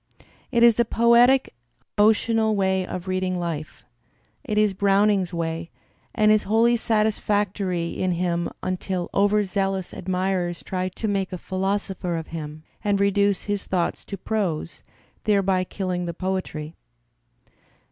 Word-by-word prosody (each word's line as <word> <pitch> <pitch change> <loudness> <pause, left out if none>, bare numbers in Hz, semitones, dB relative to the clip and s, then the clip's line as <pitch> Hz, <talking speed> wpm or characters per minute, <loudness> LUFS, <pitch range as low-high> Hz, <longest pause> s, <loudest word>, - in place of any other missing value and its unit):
It 235 -1 +3
is 235 -1 +6
a - - +6
poetic 235 +3 +4 0.4
emotional 220 +1 +3
way 190 -1 +1
of 185 +1 -6
read 185 0 -1
ing 185 -1 -1
life; 165 -3 -5 0.6
it 215 -7 -3
is 210 -2 +3
Browning*s 200 -1 +2
way 165 -1 -3 0.5
and 215 -2 +4
is 215 -1 +4
wholly 230 +2 +4
satisfactory 205 -5 0
in 185 +1 -1
him 170 0 -1
until 185 -1 -3
overzealous 195 -2 +1
admirers 180 -1 -2
try 185 0 -2
to 215 +4 -4
make 195 -2 -1
a 180 - -4
philosopher 190 -1 -2
of 160 - -6
him 155 -1 -7 0.2
and 205 -2 +1
reduce 200 0 +2
his 205 -1 -3
thoughts 180 -2 -1
to 200 - -6
prose, 180 -6 -2 0.4
thereby 195 -3 +2
killing 180 -1 -3
the 170 - -4
poetry. 185 -5 -3
190 Hz, 135 wpm, -24 LUFS, 180-210 Hz, 0.6 s, is